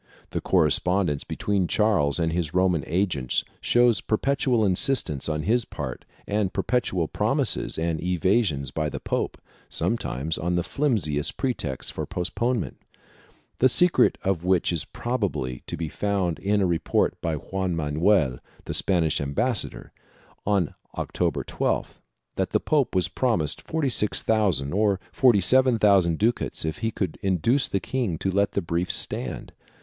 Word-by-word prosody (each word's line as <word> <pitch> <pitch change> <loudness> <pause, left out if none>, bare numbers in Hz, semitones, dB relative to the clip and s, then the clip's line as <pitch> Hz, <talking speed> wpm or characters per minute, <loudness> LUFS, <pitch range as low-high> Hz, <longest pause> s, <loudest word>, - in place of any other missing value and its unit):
The - - -2
correspondence 90 -5 +2
between 100 -3 -1
Charles 95 -11 +2
and 80 -2 0
his 85 -2 -2
Roman 90 -5 +2
agents 80 -8 0 0.2
shows 120 -3 +3
perpetual 125 0 +1
insistance 90 - +2
on 75 -1 -2
his 115 +7 +2
part 65 -10 -6 0.2
and 100 -2 0
perpetual 95 -10 0
promises - - 0
and 80 -1 -1
evasions 90 - +1
by 75 +1 -1
the - - -5
pope, - - -2 0.3
sometimes 70 +6 -2
on 85 +2 -1
the 90 - +1
flimsiest 90 - 0
pretexts 80 - -2
for - - -5
postponement, 115 +5 -2 0.8
the 130 - +5
secret 175 +7 +4
of 95 -4 0
which 90 -1 +2
is 80 - -2
prob 120 -1 -3
ably 65 -10 -2
to - - -4
be 80 - -3
found 95 -1 -1
in 100 +1 +1
a - - +3
report 85 -2 +1
by 80 -1 -1
Juan 95 +3 -3
Manuel, 75 -2 +2 0.3
the - - -4
Spanish 85 -6 +1
ambas 100 - 0
sador, - - -10 0.6
on 100 -6 +1 0.2
October - - -1
12th, - - -2 0.4
that - - 0
the - - +4
pope 145 -9 +1
was 90 -2 +2
promised 85 - 0
46,000 105 - 0
or 100 -1 +2
47,000 105 -7 +4
ducats 115 -6 0
if 80 - -3
he 115 - 0
could 95 -4 -4
induce 100 - +2
the 100 - -1
king 115 -7 -2
to 95 - -1
let 100 +1 +1
the 100 - -1
briefs 85 +2 -1
stand. 65 - -3
95 Hz, 145 wpm, -25 LUFS, 80-110 Hz, 0.8 s, the